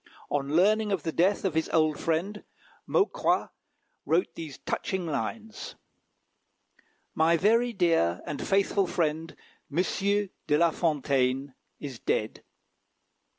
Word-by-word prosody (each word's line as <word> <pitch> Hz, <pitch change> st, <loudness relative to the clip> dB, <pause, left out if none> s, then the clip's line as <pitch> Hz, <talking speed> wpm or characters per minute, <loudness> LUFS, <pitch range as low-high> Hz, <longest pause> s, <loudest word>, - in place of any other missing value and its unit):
On 145 Hz, +1 st, -1 dB
learning 210 Hz, +4 st, +3 dB
of 185 Hz, -6 st, -1 dB
the 160 Hz, -, -2 dB
death 190 Hz, +5 st, +2 dB
of 185 Hz, -, +1 dB
his 160 Hz, 0 st, 0 dB
old 155 Hz, -2 st, +2 dB
friend, 180 Hz, +6 st, -1 dB, 0.4 s
Maucroix 405 Hz, -, +1 dB, 0.5 s
wrote 170 Hz, +3 st, +1 dB
these 155 Hz, -5 st, -8 dB
touching 190 Hz, -3 st, -3 dB
lines: 215 Hz, +9 st, -4 dB, 1.4 s
"My 165 Hz, +1 st, +3 dB
very 230 Hz, +7 st, +3 dB
dear 165 Hz, -, +2 dB
and 150 Hz, -, -5 dB
faithful 195 Hz, 0 st, +2 dB
friend, 160 Hz, -1 st, -1 dB, 0.4 s
M. 170 Hz, +6 st, +2 dB, 0.6 s
de 150 Hz, -, +3 dB
La 170 Hz, +1 st, +4 dB
Fontaine, 140 Hz, -4 st, 0 dB, 0.3 s
is 135 Hz, -5 st, -7 dB
dead. 110 Hz, -, -2 dB
165 Hz, 115 wpm, -28 LUFS, 150-195 Hz, 1.4 s, La